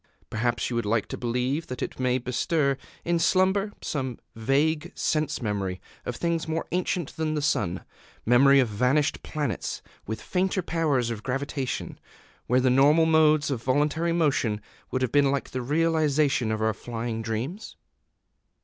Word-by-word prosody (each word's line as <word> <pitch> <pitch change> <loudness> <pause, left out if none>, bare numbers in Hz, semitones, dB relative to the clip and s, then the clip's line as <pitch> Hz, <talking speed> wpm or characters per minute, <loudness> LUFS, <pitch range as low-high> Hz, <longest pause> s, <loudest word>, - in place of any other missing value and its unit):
Perhaps 120 +1 0
you - - -2
would 120 -2 0
like 110 0 +1
to - - -3
believe 125 +6 -1
that 125 - -4
it - - -6
may 125 -1 +2
bestir, 140 +3 0 0.3
in 170 0 +1
slumber, 190 +4 +2
some 130 -5 -3 0.2
vague 140 +7 +1
sense 155 -5 -1
memory 100 -4 -2 0.3
of 125 - -2
things 170 +1 -1
more 160 +1 -2
ancient 180 -2 -1
than 155 -1 -1
the - - 0
sun, 90 - 0 0.4
memory 135 +4 +6
of 130 - +3
vanished 125 +8 +1
planets 150 -2 -3 0.2
with 110 +1 -3
fainter 185 - -1
powers 145 -9 0
of 110 -2 -5
gravitation, 135 +1 -3 0.5
where 125 +2 +3
the 130 0 +3
normal 145 +5 +5
modes 155 -2 +4
of 125 -4 -2
voluntary 150 +6 +1
motion 140 -10 +1 0.3
would 130 0 -1
have 125 - 0
been 145 -1 +4
like 140 0 -2
the 130 - -3
realization 150 -3 +2
of 110 0 -1
our 110 0 +2
flying 115 +1 -4
dreams?... 120 - -4
135 Hz, 160 wpm, -26 LUFS, 120-160 Hz, 0.5 s, memory